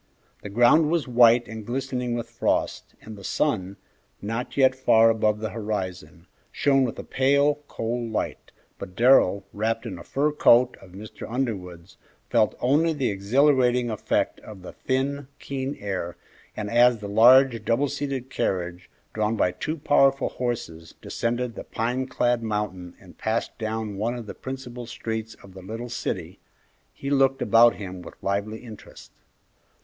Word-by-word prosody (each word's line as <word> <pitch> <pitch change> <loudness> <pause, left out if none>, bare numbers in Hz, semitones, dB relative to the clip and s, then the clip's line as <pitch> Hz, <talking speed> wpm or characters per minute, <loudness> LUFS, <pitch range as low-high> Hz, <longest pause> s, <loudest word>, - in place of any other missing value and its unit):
The 105 - -7
ground 120 +9 +4
was 165 -4 0
white 120 -1 +5
and 110 0 -7
glistening 125 0 -3
with 120 - -4
frost, - - -2
and 110 - -9
the 100 - -12
sun, 100 -7 -1 0.4
not 115 +6 -5
yet 130 -1 +5
far 115 -3 +4
above 110 -1 +1
the 110 -1 -3
horizon, 95 -6 -5 0.3
shone 135 -1 +2
with 120 - -4
a - - -6
pale, 140 +2 +2
cold 115 0 -3
light, 110 - -4 0.3
but 90 - -8
Darrell, 110 -5 +4
wrapped 115 +3 -2
in 95 -6 -6
a - - -10
fur 145 +2 0
coat 125 -4 +4
of 90 -2 -15
Mr. 105 +3 -9
Underwood's, 95 -9 -4 0.3
felt - - +3
only 155 +6 +2
the 135 -7 -1
exhilarating 125 +3 +2
effect 110 - -1
of 100 -4 -12
the - - -8
thin, 135 +1 -2
keen 135 0 -4
air, 90 -4 -4 0.4
and 105 - -3
as 120 0 +5
the 105 -1 -7
large, 120 +2 +5
double 120 +6 +1
seated 135 -2 -4
carriage, 90 -4 -3 0.2
drawn 110 +1 0
by 90 - +1
two 155 - -4
powerful 135 -2 +3
horses, 120 -10 -5
descended 120 +1 -2
the - - -8
pine 125 +3 -2
clad 120 -2 +1
mountain 105 -5 -4
and 90 -2 -17
passed 110 +1 -2
down 110 -2 -3
one 115 +4 -1
of 120 -2 -7
the - - -7
principal 125 -2 -7
streets 110 -1 -5
of 95 - -14
the 95 - -11
little 115 +6 -7
city, 95 -6 -4 0.5
he 140 - -6
looked 135 -1 +3
about 115 +1 +5
him 95 -3 -7
with - - -11
lively 100 +3 -2
interest. 110 -4 -12
115 Hz, 160 wpm, -25 LUFS, 105-130 Hz, 0.5 s, white